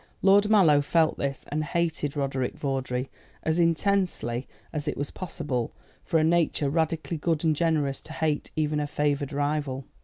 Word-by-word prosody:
Lord 200 +2 +5
Mallow 170 -9 +6
felt 160 +2 +2
this, 140 -1 -3
and 155 +1 -1
hated 155 -3 -1
Roderick 135 -2 -1
Vawdrey 130 -2 -2 0.3
as 160 +2 +1
intensely 165 - +1 0.3
as 150 0 -3
it 150 - -1
was 145 0 -3
possible 150 -9 -3 0.3
for 165 - +1
a 155 - +3
nature 160 -3 +2
radically 165 +1 0
good 160 0 0
and 160 -2 +3
generous 150 -4 +1
to 155 - -10
hate 155 -2 -1
even 150 -1 0
a 145 - -1
favoured 145 -1 0
rival. 145 -2 -1
150 Hz, 160 wpm, -27 LUFS, 140-165 Hz, 0.3 s, Mallow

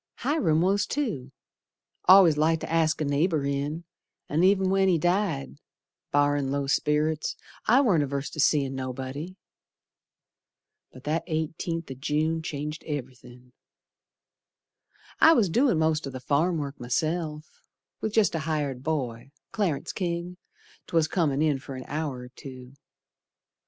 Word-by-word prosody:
Hiram 165 - +1
was 195 +3 +2
too, 200 - -3 0.8
Al'ays 185 -5 +8
liked 155 +2 +2
to - - -6
ask 160 -1 +2
a - - +1
neighbor 145 +1 +1
in, 140 +4 -2 0.5
An' 155 +4 +1
ev'n 190 0 +4
when 195 0 +3
he 180 -3 +4
died, 175 - -1 0.5
Barrin' 145 -1 +2
low 140 0 -1
sperrits, 150 +2 0 0.3
I 250 +5 +6
warn't 190 - +3
averse 140 0 -3
to 155 - -8
seein' 140 -2 +2
nobody. 130 +6 -5 1.6
But 130 - -14
that 155 +3 -1
eighteenth 160 0 -3
o' - - -3
June 155 +4 -1
changed 150 0 -5
ev'rythin'. 125 -3 -8 1.7
I 320 - +8
was 220 - +3
doin' 245 - +3
most 160 -2 +1
o' - - -4
th' 130 -1 -8
farmwork 145 0 0
myself, 155 +4 -3 0.4
With 220 - -3
jest 220 -3 +3
a 165 - -1
hired 150 -5 -2
boy, 135 -5 -3 0.2
Clarence 185 -10 -1
King, 175 -1 -3 0.5
'twas, 165 -2 +2
Comin' 155 -4 +1
in 150 -3 +1
fer 135 0 -8
an 130 - -7
hour 145 -4 -3
or 125 - -10
two. 130 -1 -11
155 Hz, 135 wpm, -27 LUFS, 140-170 Hz, 1.7 s, Al'ays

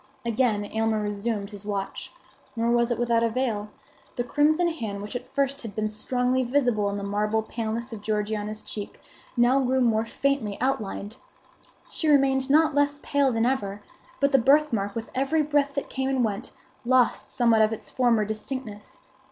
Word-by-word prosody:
Again 230 -3 +1
Aylmer 220 +1 0
resumed 205 0 -3
his 205 -1 -7
watch. 200 -2 -4 0.4
Nor 230 +1 +1
was 235 0 +3
it 240 - 0
without 235 -1 +2
avail. 230 -3 -1 0.5
The 245 - -1
crimson 310 +7 +2
hand, 225 -11 -4
which 210 - -7
at 245 - -5
first 275 0 0
had 220 -4 -8
been 215 0 -1
strongly 250 +4 0
visible 245 -5 +1
upon 200 0 -2
the 200 - -5
marble 210 +2 0
paleness 230 +2 -4
of 215 - -7
Georgiana's 210 0 -2
cheek, 205 -1 -7 0.4
now 245 +3 +4
grew 260 0 +1
more 225 -3 +3
faintly 260 -4 -1
outlined. 220 -4 -2 0.7
She 320 - -2
remained 270 -2 +3
not 310 +2 +4
less 285 0 +1
pale 280 -2 +2
than 225 -1 +1
ever; 205 -6 -1 0.4
but 280 0 +2
the 270 - +5
birthmark 240 -6 +2
with 230 0 -5
every 275 +4 +1
breath 290 -1 +1
that 280 - -2
came 265 0 -2
and 260 -3 +2
went, 205 -2 -4 0.3
lost 250 0 +2
somewhat 235 -3 +3
of 215 0 +4
its 220 - -6
former 240 -4 +2
distinctness. 215 0 -6
235 Hz, 170 wpm, -26 LUFS, 215-265 Hz, 0.7 s, the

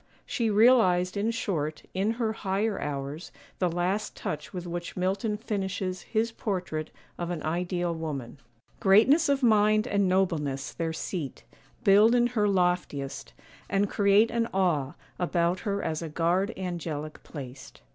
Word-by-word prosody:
She 230 -3 -1
realized, 205 -5 +4
in 205 +2 0
short, 160 -9 -2
in 200 +4 +1
her 225 -2 -1
higher 205 +1 -1
hours, 145 +2 -4 0.3
the 180 - +2
last 180 +5 -1
touch 150 0 -5
with 180 -2 -6
which 175 +1 -5
Milton 195 +4 0
finishes 190 -4 -3
his 225 +1 -1
portrait 180 -8 -3 0.3
of 175 -1 -3
an 170 -4 -4
ideal 175 +1 -1
woman:— 145 -6 -5 0.4
'Greatness 245 - +5
of 280 -1 +1
mind 215 -1 +4
and 200 -5 +1
nobleness, 150 -8 0
their 165 -1 -2
seat 160 -3 -5 0.4
Build 210 +3 +6
in 240 0 +4
her 210 -3 +2
loftiest, 180 - -1 0.4
and 200 +1 +1
create 205 +2 +4
an 230 0 0
awe 155 -8 +1 0.2
About 175 0 +1
her 200 -1 -2
as 155 0 -2
a 165 - -4
guard 175 +6 +1
angelic 165 -5 -4
placed. 130 - -10
185 Hz, 145 wpm, -28 LUFS, 165-210 Hz, 0.4 s, Build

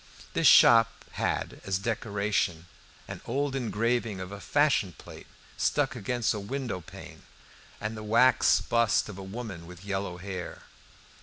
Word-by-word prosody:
This - - +3
shop 115 -1 +8 0.2
had - - -2
as 95 -1 -1
decoration 100 -5 -1 0.4
an - - -8
old 140 0 -1
engraving 115 -3 -1
of 95 +1 -7
a 100 - -7
fashion 145 - +2
plate - - -12 0.3
stuck - - +1
against 120 +2 -1
a 105 - -4
windowpane 105 - -6 0.6
and 110 +1 -4
the 110 - -7
wax 115 +4 +4
bust 115 -2 +1
of 100 -2 -8
a - - -7
woman 95 -4 -7
with 90 +1 -12
yellow 95 -2 -3
hair. 95 -1 -7
105 Hz, 140 wpm, -28 LUFS, 95-120 Hz, 0.6 s, shop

